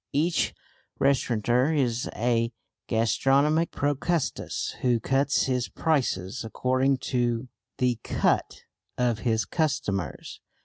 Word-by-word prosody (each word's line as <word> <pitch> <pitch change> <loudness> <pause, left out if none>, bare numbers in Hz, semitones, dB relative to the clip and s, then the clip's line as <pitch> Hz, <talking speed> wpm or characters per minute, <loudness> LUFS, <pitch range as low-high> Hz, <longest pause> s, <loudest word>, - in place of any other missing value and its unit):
Each 160 +5 +1 0.4
restaurateur 125 +1 +2
is 125 -4 0
a 115 0 +1 0.4
gastronomic 135 - +2
Procrustes 145 +3 -1
who 120 -2 +2
cuts 135 +4 +2
his 125 -2 -1
prices 120 - -1
according 130 +4 +1 0.2
to 120 0 0 0.3
"the 125 -2 +1
cut" - - 0 0.3
of 120 -3 +1
his 110 -2 0
customers. 100 - -2
125 Hz, 95 wpm, -26 LUFS, 115-140 Hz, 0.4 s, restaurateur